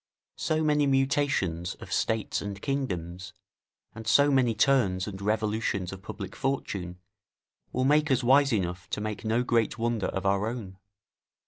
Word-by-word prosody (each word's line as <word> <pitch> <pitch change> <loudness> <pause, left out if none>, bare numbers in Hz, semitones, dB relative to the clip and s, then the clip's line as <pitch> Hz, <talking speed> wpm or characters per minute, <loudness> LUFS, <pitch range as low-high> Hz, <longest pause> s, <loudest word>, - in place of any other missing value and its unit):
So 155 0 0
many 150 -1 +3
mutations 135 - +1
of - - -8
states 110 -1 0
and 100 -1 -5
kingdoms, 95 -10 -3 0.6
and 110 0 -9
so 140 +6 +5
many 125 -4 +3
turns 110 -7 +2
and 100 -2 -7
revolutions 105 -3 -1
of 95 - -9
public 100 -1 -7
fortune, 100 -10 -3 0.7
will 130 +1 0
make 150 +2 +3
us 130 -2 +2
wise 135 +3 +5
enough 90 -4 -2
to - - -2
make 105 0 -4
no 115 +2 +1
great 120 -2 +1
wonder 115 -3 0
of 95 0 -4
our 100 +2 +2
own. 105 -6 -6
110 Hz, 150 wpm, -28 LUFS, 95-135 Hz, 0.7 s, so